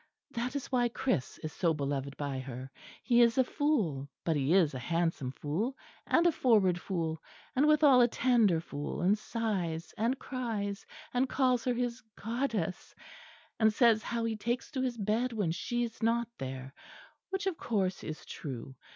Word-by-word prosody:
That 245 +1 -3
is 280 - -4
why 245 -2 +3
Chris 235 - -1
is 155 0 -4
so 165 -2 +1
beloved 140 -1 -3
by 140 -2 -3
her. 130 0 -7 0.3
He 240 -2 +4
is 235 0 +4
a 260 - +6
fool, 205 - 0 0.2
but 165 - +2
he 140 +1 +1
is 175 -6 +4
a 130 - -4
handsome 165 -1 -1
fool, 185 - -2 0.3
and 340 - +4
a 345 - +6
forward 200 - +3
fool, 165 -4 -2 0.3
and 280 +4 +4
withal 295 -4 +6
a 240 - +6
tender 230 -8 +3
fool; 145 +1 -5
and 195 +3 +5
sighs 190 -8 -3
and 235 +5 +1
cries, 220 -7 -4 0.3
and 250 +1 +2
calls 255 -3 +2
her 250 - +2
his 245 0 -2
Goddess; 225 -6 -2 0.6
and 220 -1 +5
says 225 -1 +4
how 230 0 -2
he 225 -1 -1
takes 235 +4 -2
to 265 -3 -2
his 250 -2 -1
bed 225 +4 0
when 205 -7 0
she 240 +8 -1
is 230 -1 -6
not 230 +1 +2
there, 130 0 -6 0.6
which 385 +1 -2
of 380 -4 -1
course 195 -5 -1
is 155 -1 -6
true. 130 -2 -7
220 Hz, 175 wpm, -31 LUFS, 160-245 Hz, 0.6 s, a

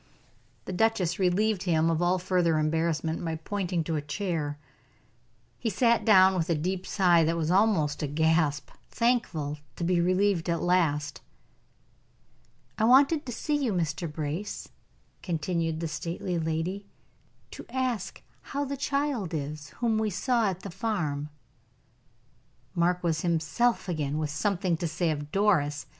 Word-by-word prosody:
The 185 - -5
duchess 185 -4 +1
relieved 195 +2 +2
him 165 -3 +2
of 165 +1 0
all 175 +1 +3
further 175 -3 +1
embarrassment 160 +1 0
by 165 -1 -2
pointing 180 +1 -2
to 160 0 -2
a - - -2
chair. 150 -2 -3 1.0
He 230 - -1
sat 235 +3 +2
down 190 -3 +6
with 175 -1 -1
a 170 - +3
deep 185 +4 -2
sigh 175 -4 +4
that 165 +1 +1
was 165 0 0
almost 185 -7 +2
a 150 - -1
gasp 160 0 +1 0.2
thankful 175 - 0 0.2
to - - -5
be 175 0 +2
relieved 185 -1 +1
at 170 - +1
last. 155 -5 +1 1.6
"I - - +2
wanted 275 +5 +5
to - - -3
see 295 +5 -1
you, 240 - +1
Mr. 160 -2 -2
Brace," 155 +6 -4 0.5
continued 165 -1 -2
the 165 - -1
stately 170 +2 -3
lady, 165 +5 -2 0.6
"to - - -10
ask 255 -6 -2 0.2
how 285 0 -3
the 280 0 -4
child 275 - -1
is 150 0 -5
whom 225 -2 +2
we 220 -1 0
saw 225 +3 +1
at 185 -1 -5
the 195 - -7
farm." 170 -8 -2 1.4
Mark 175 +1 +1
was 160 -2 0
himself 170 +8 +1
again 150 -4 -2
with 155 -1 -2
something 180 +2 0
to 170 - -2
say 165 +1 0
of 145 -1 -5
Doris. 155 -8 +1
175 Hz, 150 wpm, -28 LUFS, 160-200 Hz, 1.6 s, down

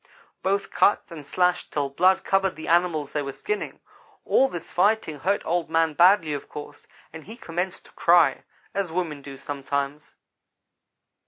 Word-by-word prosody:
"Both 195 +1 -1
cut 205 - +3
and 160 -3 -8
slashed 180 +4 0
till 145 -2 -1
blood 185 +6 +3
covered 195 -1 +1
the 160 - -8
animals 170 -4 +1
they 150 - 0
were 140 -1 -4
skinning. 420 - -4 0.4
All 270 - +4
this 175 -9 -7
fighting 185 -5 +1
hurt 195 +7 0
Old 170 -1 -1
man 165 -1 +2
badly, 175 -1 +5
of 145 - -6
course, 145 0 -10 0.3
and 160 -1 -10
he 220 +4 -10
commenced 180 -2 -4
to - - -18
cry, 170 0 +4 0.3
as 195 -4 -2
women 165 -4 -3
do 140 -1 -10
sometimes. 140 +1 -4
170 Hz, 160 wpm, -25 LUFS, 150-185 Hz, 0.4 s, badly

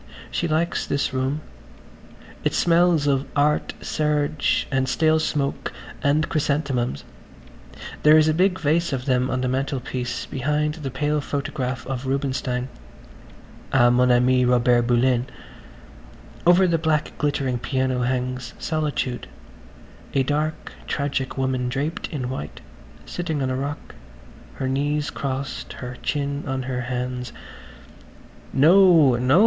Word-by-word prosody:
She 170 - -1
likes 165 +2 0
this 140 -1 -1
room. 130 +3 -1 1.0
It - - 0
smells 170 -3 +3
of 140 -1 +1
art 150 +1 +1
serge 150 -1 0
and 130 -1 +1
stale 160 +2 +3
smoke 140 -3 -1 0.3
and 150 +2 +2
chrysanthemums... 140 - -1 1.0
there 150 +1 +7
is 155 0 +5
a 155 - +3
big 185 +3 +2
vase 165 0 +1
of 130 -1 -3
them 130 -1 +1
on 130 0 -1
the 130 - 0
mantelpiece 130 -1 -2
behind 150 +3 -1
the 150 -4 -5
pale 150 +3 0
photograph 130 -3 -3
of 135 -1 -4
Rubinstein... 130 -2 -1 1.0
á 120 -2 +5
mon 125 +1 +4
ami 125 +1 +4
Robert 120 -1 +3
Bullen..... 125 +1 +2 1.2
Over 180 +2 +6
the 170 -2 +2
black 155 -2 0
glittering 135 -4 0
piano 130 -1 -1
hangs 125 -1 -2
"Solitude"–a 135 - -4
dark 150 +3 -2 0.2
tragic 140 -2 -2
woman 130 -2 0
draped 145 +6 -2
in 130 -5 -4
white, 75 - -6 0.4
sitting 160 -5 -3
on 130 - -1
a - - -1
rock, 140 +2 -5 0.6
her 130 - -3
knees 145 +2 0
crossed, 135 0 -4
her 125 0 -7
chin 140 -1 -2
on 130 0 -2
her 130 -1 -3
hands. 125 0 -3 1.2
"No, 160 -2 +6
no!" 130 +7 +4
135 Hz, 125 wpm, -23 LUFS, 125-150 Hz, 1.2 s, there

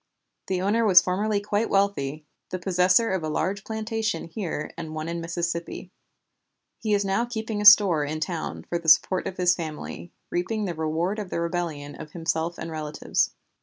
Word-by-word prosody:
The 185 -1 -1
owner 220 +4 +2
was 190 -5 +8
formerly 200 +3 0
quite 205 +2 -1
wealthy, 155 -7 0 0.2
the 185 - -3
possessor 180 +4 +3
of 190 -2 0
a 155 - -3
large 190 +5 -1
plantation 220 -3 -2
here 165 -3 -4
and 160 -2 -6
one 155 0 -4
in 170 0 -3
Mississippi. 170 +1 -4 0.9
He 215 -2 +1
is 200 0 0
now 195 +4 +1
keeping 220 -3 -4
a - - -2
store 200 -7 +8
in 155 +2 -3
town 160 +1 -4
for 170 - -1
the 165 -1 0
support 185 +4 +4
of 185 - -6
his 180 0 +4
family, 150 - -6 0.2
reaping 210 +5 -1
the 180 - -2
reward 165 +6 -1
of 205 -3 -5
the - - -2
rebellion 170 -4 -3
of 155 - -10
himself 165 0 -2
and 165 - -6
relatives." 155 -1 -1
180 Hz, 180 wpm, -25 LUFS, 160-205 Hz, 0.9 s, was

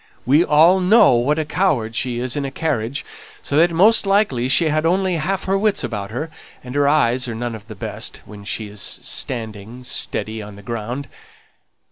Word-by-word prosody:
"We 145 +7 +4
all 165 +4 +5
know 190 - +5
what 125 +6 +1
a 155 - -1
coward 145 - 0
she 125 0 -2
is 125 0 -2
in 145 - -2
a 135 - -3
carriage, 135 -3 -2 0.4
so 140 - -2
that 170 +3 +5
most 195 +6 +4
likely 195 - +2
she 160 +4 +4
had 155 +1 0
only 180 +1 +1
half 190 +5 -2
her 195 - 0
wits 210 +1 +1
about 100 -3 -4
her, 150 +8 -5 0.3
and 125 0 -8
her 145 0 +2
eyes 130 -4 +2
are 115 - -4
none 120 +1 -4
of 110 0 -10
the 110 - -9
best 95 - -4
when 105 -1 -12
she 105 +1 -4
is 105 -1 -8
standing 110 +2 -3
steady 110 -2 -2
on 105 -1 -10
the 100 - -13
ground. 120 +5 -5
130 Hz, 195 wpm, -20 LUFS, 115-165 Hz, 0.4 s, all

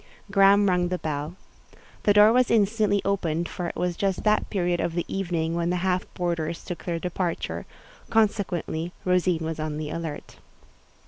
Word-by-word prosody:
Graham 200 +1 +5
rung 180 -1 +2
the 180 +1 -1
bell. 155 0 -4 0.7
The 205 - +5
door 210 +2 +7
was 250 0 +3
instantly 210 -2 +2
opened, 170 -4 0
for 175 - -4
it - - -6
was 180 -1 -1
just 195 0 -1
that 215 0 +2
period 175 -3 0
of 165 - -1
the 175 - -1
evening 170 -4 -2
when 170 0 0
the 180 - +1
half 185 -1 0
boarders 170 -2 -2
took 175 - -6
their 170 -2 -1
departure—consequently, 180 - -2
Rosine 180 -3 +2
was 160 0 -4
on 155 -1 -3
the 155 -1 -4
alert. 165 -3 -6
180 Hz, 165 wpm, -25 LUFS, 165-195 Hz, 0.7 s, door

